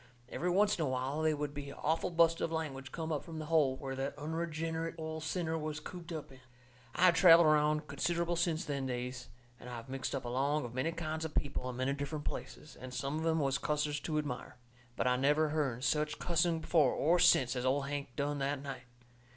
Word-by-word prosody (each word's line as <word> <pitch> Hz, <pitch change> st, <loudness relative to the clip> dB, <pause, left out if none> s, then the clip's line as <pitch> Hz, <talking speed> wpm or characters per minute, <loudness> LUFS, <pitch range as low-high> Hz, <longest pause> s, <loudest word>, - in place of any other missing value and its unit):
Every 180 Hz, -, -2 dB
oncet 200 Hz, +2 st, +3 dB
in 160 Hz, -, +1 dB
a -, -, -1 dB
while 130 Hz, +4 st, -1 dB
they 155 Hz, -1 st, +2 dB
would 145 Hz, 0 st, -3 dB
be 145 Hz, -1 st, -6 dB
a -, -, -9 dB
awful 160 Hz, +2 st, 0 dB
bust 165 Hz, -1 st, +3 dB
of 165 Hz, -, -1 dB
language 135 Hz, -5 st, -4 dB
come 160 Hz, -1 st, -4 dB
up 150 Hz, -2 st, -1 dB
from 165 Hz, 0 st, -8 dB
that 155 Hz, -, -4 dB
hole 150 Hz, -4 st, +3 dB
where 135 Hz, -1 st, -5 dB
that 135 Hz, +1 st, -3 dB
unreginerate 160 Hz, +1 st, -3 dB
old 160 Hz, 0 st, -5 dB
sinner 160 Hz, 0 st, -2 dB
was 155 Hz, -1 st, -4 dB
cooped 175 Hz, +2 st, -9 dB
up 155 Hz, -4 st, -6 dB
in. 130 Hz, -, -14 dB, 0.6 s
I -, -, +1 dB
have 180 Hz, -, +7 dB
travelled 170 Hz, -1 st, +8 dB
around 150 Hz, 0 st, +3 dB
considerable 170 Hz, +4 st, 0 dB
since 170 Hz, 0 st, 0 dB
them 140 Hz, -2 st, -2 dB
days, 125 Hz, 0 st, -4 dB, 0.3 s
and 125 Hz, -, -10 dB
I 120 Hz, -, -6 dB
have 115 Hz, +2 st, -9 dB
mixed 135 Hz, +1 st, -3 dB
up 135 Hz, -, -4 dB
along 140 Hz, +4 st, 0 dB
of 120 Hz, -, -7 dB
many 130 Hz, +6 st, 0 dB
kinds 160 Hz, -1 st, -3 dB
of 160 Hz, -1 st, -5 dB
people 135 Hz, -3 st, -1 dB
in 125 Hz, -, -5 dB
many 130 Hz, +2 st, 0 dB
different 145 Hz, +1 st, -4 dB
places, 150 Hz, -, -6 dB
and 130 Hz, 0 st, -9 dB
some 140 Hz, +4 st, -2 dB
of 160 Hz, -, -3 dB
'em 160 Hz, 0 st, +2 dB
was 140 Hz, -2 st, +1 dB
cussers 150 Hz, 0 st, -1 dB
to 155 Hz, -2 st, -1 dB
admire. 140 Hz, -4 st, -4 dB, 0.4 s
But -, -, -1 dB
I 125 Hz, 0 st, +3 dB
never 150 Hz, +4 st, +3 dB
hearn 140 Hz, -5 st, -1 dB
such 150 Hz, +3 st, +1 dB
cussing 170 Hz, -1 st, +1 dB
before 155 Hz, -5 st, +3 dB
or 170 Hz, +4 st, +3 dB
since 130 Hz, -5 st, +5 dB
as 125 Hz, -, -2 dB
old 135 Hz, +2 st, +1 dB
Hank 140 Hz, -3 st, -4 dB
done 145 Hz, 0 st, -1 dB
that 140 Hz, 0 st, -1 dB
night. 135 Hz, -3 st, -6 dB
150 Hz, 225 wpm, -33 LUFS, 135-160 Hz, 0.6 s, travelled